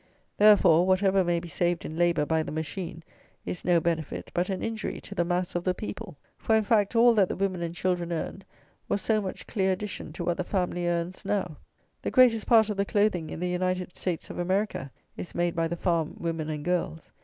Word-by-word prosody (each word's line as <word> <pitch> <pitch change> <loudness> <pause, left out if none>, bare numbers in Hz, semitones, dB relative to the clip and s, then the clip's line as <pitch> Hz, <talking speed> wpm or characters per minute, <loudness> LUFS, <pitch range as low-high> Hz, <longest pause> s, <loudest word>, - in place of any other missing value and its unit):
Therefore, 185 -5 +6
whatever 190 0 +3
may 175 -1 +1
be 175 - -9
saved 175 0 -1
in 155 - -6
labour 170 -3 +2
by 160 +1 +1
the 155 - -5
machine 165 +2 -5 0.4
is 180 - -5
no 175 -1 +4
benefit, 165 -2 -3
but 175 +2 0
an 190 -1 -3
injury 225 -1 -3
to - - -9
the 175 - +1
mass 175 +1 -1
of 175 - -2
the 185 0 0
people. 210 -5 -7 0.2
For, 220 - +2
in 220 - +3
fact, 210 0 +2
all 235 +1 +6
that 200 -5 +3
the - - -2
women 190 -2 -1
and 170 0 -4
children 175 -1 -1
earned 170 +3 -4 0.5
was - - +1
so 215 +2 +1
much 190 -2 -6
clear 190 -3 +1
addition 195 -4 -6
to 175 - -5
what 175 0 0
the 185 - -1
family 180 -2 -1
earns 175 +2 -2
now. 190 -6 -2 0.4
The - - -2
greatest 245 -4 +4
part 225 -2 +6
of 205 - -4
the 200 - +2
clothing 205 -6 +1
in - - -6
the 180 - -1
United 180 0 -2
States 175 -3 -3
of - - -7
America 185 -6 -1 0.3
is - - -7
made 175 0 0
by 165 -1 +1
the 170 +1 -4
farm 170 -3 0
women 165 -2 -3
and 150 -1 -4
girls. 175 -2 -2
180 Hz, 220 wpm, -27 LUFS, 170-200 Hz, 0.5 s, Therefore